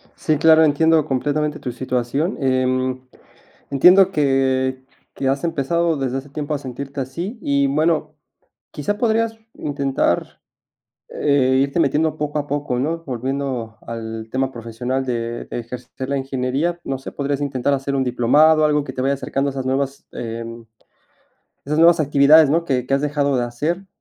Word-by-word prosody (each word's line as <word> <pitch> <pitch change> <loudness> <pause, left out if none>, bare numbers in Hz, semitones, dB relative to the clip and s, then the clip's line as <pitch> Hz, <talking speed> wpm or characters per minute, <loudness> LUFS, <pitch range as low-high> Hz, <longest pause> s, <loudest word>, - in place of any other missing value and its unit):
Sí, 155 -2 0
claro, 160 +1 +6
entiendo 160 +1 +3
completamente 145 +2 -1
tu 125 - -4
situación. 130 - -2
Em, 130 -1 0 0.7
entiendo 180 +7 +6
que 130 -3 +1 0.3
que 135 - -2
has 135 +3 -1
empezado 165 +1 0
desde 135 -2 -2
hace 135 +2 -7
tiempo 150 +1 -3
a - - -1
sentirte 135 +1 -7
así 170 - -4
y, 140 -6 +1
bueno, 155 +1 0 0.6
quizás 150 +8 -2
podrías 225 0 +1 0.2
intentar, 140 -2 -1 0.7
eh, 130 -2 +2
irte 140 +5 -2
metiendo 155 +1 +2
poco 150 0 -2
a 145 - -3
poco, 145 -3 -2
¿no? 165 +5 -2
Volviendo 130 -2 -3
al 110 -1 -6
tema 130 0 -1
profesional 120 +2 -3
de 120 -1 -3
de - - -6
ejercer 125 +2 -7
la 140 - 0
ingeniería. 135 +6 -2
No 135 -1 -3
sé, - - -8
podrías 140 0 -2
intentar 140 -1 0
hacer 140 0 -2
un 135 - +1
diplomado, 150 +6 +4
algo 150 -1 +2
que 130 -2 -7
te 130 - -3
vaya 135 +2 +1
acercando 140 +1 -2
a - - -5
esas 135 -1 -4
nuevas, 135 +1 -2
em, 115 0 -6 1.0
esas 150 +2 -1
nuevas 170 +1 +6
actividades, 145 +1 +6
¿no? 165 +3 +2
Que 125 -4 0
que 135 - -4
has 135 - +1
dejado 145 -2 0
de 120 - +1
hacer. 155 +11 -3
140 Hz, 160 wpm, -20 LUFS, 130-150 Hz, 1.0 s, claro